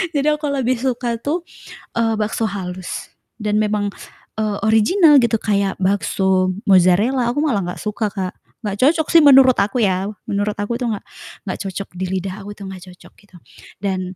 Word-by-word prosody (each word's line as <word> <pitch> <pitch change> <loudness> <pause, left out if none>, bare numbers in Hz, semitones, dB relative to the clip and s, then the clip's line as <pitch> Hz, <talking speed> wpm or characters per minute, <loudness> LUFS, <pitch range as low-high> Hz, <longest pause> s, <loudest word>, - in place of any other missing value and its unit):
jadi 285 +1 +1
aku 300 - -5
lebih 255 -2 0
suka 245 -2 -2
tuh, 300 +9 -2 0.5
eee, 225 -1 +1
bakso 220 +1 -1
halus 185 -2 -6 0.2
dan 210 -1 0
memang, 210 -1 -1 0.5
eee, 210 -2 -1
original 275 - +5
gitu. 230 -1 +2
Kayak 200 -2 0
bakso 190 0 +1
mozarella, 205 +7 +4
aku 245 - -1
malah 225 -9 +1
gak - - -11
suka 210 0 -2
Kak. 190 -3 -4 0.3
Gak 200 -1 -3
cocok 315 +3 +3
sih 330 - +8
menurut 270 -3 +7
aku 210 +6 0
ya, 190 0 +1 0.2
menurut 205 +1 -1
aku 205 +3 -2
tuh 245 -2 -1
gak - - -11 0.4
gak 185 - -3
cocok 195 0 -5
di 190 - -1
lidah 190 +1 -4
aku 205 +1 -9
tuh 200 - -10
gak 190 - -8
cocok 180 - -17
gitu 200 -3 -22 0.5
dan 185 -1 -2
210 Hz, 175 wpm, -19 LUFS, 195-240 Hz, 0.5 s, sih